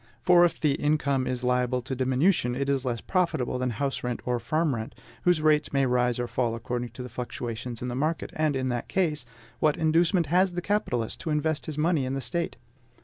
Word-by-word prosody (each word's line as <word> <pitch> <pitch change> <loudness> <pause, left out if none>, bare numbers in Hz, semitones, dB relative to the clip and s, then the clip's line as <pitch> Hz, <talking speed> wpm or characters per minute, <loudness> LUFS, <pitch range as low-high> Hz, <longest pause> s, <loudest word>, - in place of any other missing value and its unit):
For, 175 -1 +6
if 175 - +2
the 150 -3 +2
income 140 -3 +1
is 125 0 -3
liable 125 0 +1
to 130 - -4
diminution, 130 +1 +2
it 140 +1 -1
is 135 -1 0
less 120 -3 -2
profitable 170 -9 0
than 125 0 0
house 135 +4 -2
rent 125 -1 -2
or 125 -1 0
farm 155 +6 0
rent, 110 -2 -5 0.3
whose 175 -3 +3
rates 150 -1 +3
may 140 -1 +2
rise 125 -1 +2
or 120 0 -2
fall 120 0 -1
according 120 +1 -3
to 125 - -7
the - - -6
fluctuations 120 -1 -5
in - - -2
the 120 - -3
market; 155 +6 -1
and 155 -2 +1
in 130 -1 -1
that 120 -1 -2
case, 155 -9 0 0.3
what 150 -1 +2
inducement 165 +2 +3
has 180 +4 +2
the 175 - -2
capitalist 185 - -1
to - - -5
invest 155 0 0
his 155 -2 -5
money 155 -2 +2
in 130 +1 -2
the - - -1
State? 170 +4 -2
135 Hz, 215 wpm, -27 LUFS, 125-155 Hz, 0.3 s, For